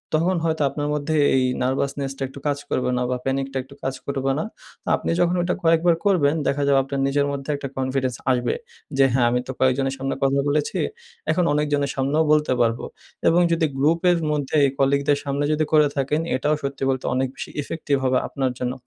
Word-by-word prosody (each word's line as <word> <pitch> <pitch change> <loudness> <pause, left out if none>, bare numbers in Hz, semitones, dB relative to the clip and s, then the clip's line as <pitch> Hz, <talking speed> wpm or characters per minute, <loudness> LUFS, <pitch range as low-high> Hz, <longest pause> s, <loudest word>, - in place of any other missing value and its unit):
তখন 175 +4 +2
হয়তো 160 -1 0
আপনার 145 +1 -3
মধ্যে 150 +1 -1 0.2
এই 130 - +3 0.2
নার্ভাসনেস 135 +1 -1
টা - - -13
একটু 135 +1 -11
কাজ 145 -1 +1
করবে 125 - 0
না - - 0
বা 125 - 0
প্যানিক 135 0 0
টা - - -2
একটু 135 +2 -16
কাজ 135 - -1
করবে 135 -1 -1
না। - - -1 0.4
তো - - -21
আপনি - - -4
যখন 175 0 +2
ওইটা 175 +1 0
কয়েকবার 165 +1 +4
করবেন 160 -7 +3
দেখা 145 +1 +1
যাবে 140 -1 +4
আপনার 135 +1 -4
নিজের 140 +1 +1
মধ্যে 140 0 -5
একটা 140 -1 -5
কনফিডেন্স 130 -1 -1 0.2
আসবে। 125 -1 +1 0.4
যে 135 - +6
হ্যাঁ, 125 -2 +3
আমি 125 - +2
তো - - -3
কয়েকজনের 135 +1 +2
সামনে 135 0 -2
কথা 135 0 +2
বলেছি। 150 0 0 0.5
এখন 180 - +2
অনেকজনের 145 -1 0
সামনেও 140 +4 +1
বলতে 150 -3 +3
পারবো। 115 0 +1 0.4
এবং 175 +2 +4
যদি 165 -1 +2
গ্রুপের 165 +5 +3
মধ্যে 145 -1 -2
এই 135 - +1
কলিগদের 140 +1 +2
সামনে 140 0 -1
যদি 155 0 +1
করে 150 -1 +6
থাকেন, 140 +3 0
এটাও 150 +4 +1
সত্যি 140 0 -3
বলতে 130 -1 -1
অনেক 130 +1 +1
বেশি - - -7
ইফেক্টিভ 150 -1 -2
হবে 130 -1 +2
আপনার 135 -2 -1
জন্য। 125 0 -1
140 Hz, 205 wpm, -23 LUFS, 135-150 Hz, 0.5 s, যে